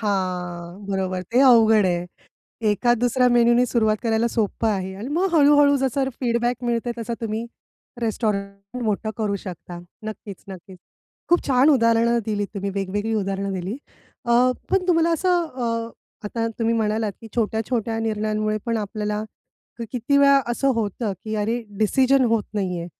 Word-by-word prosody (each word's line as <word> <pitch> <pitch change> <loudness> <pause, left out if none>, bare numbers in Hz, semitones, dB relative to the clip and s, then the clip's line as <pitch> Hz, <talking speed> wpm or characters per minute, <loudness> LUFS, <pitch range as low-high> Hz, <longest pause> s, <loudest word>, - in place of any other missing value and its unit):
हां, 180 -2 -3
बरोबर. 185 -1 -2
ते 245 +3 +3
अवघड 225 -5 +6
आहे. 175 -1 0 0.7
एका-दुसऱ्या 240 +3 +2
मेनूनी 240 +1 +4
सुरुवात 220 -3 +1
करायला 225 0 +1
सोपं 225 0 -1
आहे 190 -2 -2
आणि 210 +7 -6
मग 370 +3 +2
हळू-हळू 290 -1 +5
जसं 265 0 0
फीडबॅक 240 0 0
मिळते, 240 0 -1
तसा 230 +1 -3
तुम्ही 225 +1 -3 0.5
रेस्टॉरंट 205 0 -3
मोठं 215 0 -1
करू 210 -3 -1
शकता. 175 -2 -8 0.3
नक्कीच-नक्कीच, 195 -3 -9 0.5
खूप 345 +1 +2
छान 270 +2 +4
उदाहरणं 230 -2 +3
दिलीत 205 -2 -1
तुम्ही. 200 0 -3
वेगवेगळी 205 +3 -2
उदाहरणं 195 -1 -2
दिलीत. 190 +6 -4 0.5
अ, 235 - +2 0.4
पण 385 -1 +1
तुम्हाला 335 -1 +3
असं 355 +1 +1
अ, 230 -6 -3 0.3
आता 230 +2 -2
तुम्ही 230 0 +1
म्हणालात, 215 -1 0
की 225 - -10
छोट्या-छोट्या 225 0 -1
निर्णयांमुळे 215 -1 -1
पण 230 -1 0
आपल्याला 210 0 -3 0.7
किती 250 +3 0
वेळा 280 -1 +6
असं 270 +3 0
होतं, 215 -1 -2
की 215 0 -3
अरे, 225 +3 -1 0.2
डिसिजन 260 +4 +3
होत 225 -2 +2
नाहीये. 180 -4 -2
225 Hz, 140 wpm, -23 LUFS, 200-240 Hz, 0.7 s, अवघड